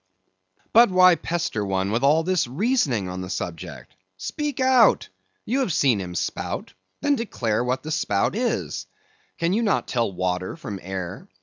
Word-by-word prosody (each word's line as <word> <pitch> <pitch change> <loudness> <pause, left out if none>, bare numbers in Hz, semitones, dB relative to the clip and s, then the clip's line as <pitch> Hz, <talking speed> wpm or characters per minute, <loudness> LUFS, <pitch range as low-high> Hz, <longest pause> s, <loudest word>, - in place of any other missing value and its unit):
But 235 0 +7
why 185 -1 +6
pester 165 -10 -2
one 95 0 -1
with 115 +2 0
all 155 +4 +4
this 180 -5 +1
reasoning 140 - 0
on 90 0 -5
the 90 - -6
subject? 85 -4 -6 0.2
Speak 285 - -4
out! 260 -4 +4 0.4
You 255 +5 0
have 255 -9 0
seen 130 -9 +2
him 90 -1 -6
spout; - - -3 0.3
then 290 - +2
declare 120 - -1
what 125 +1 -1
the 155 - -5
spout 105 - 0
is; 240 +2 -2 0.5
can 170 +2 0
you 220 - +2
not 210 -4 +1
tell 115 -6 0
water 90 0 -2
from 100 -2 -6
air? 95 0 -6
130 Hz, 165 wpm, -24 LUFS, -, 0.5 s, But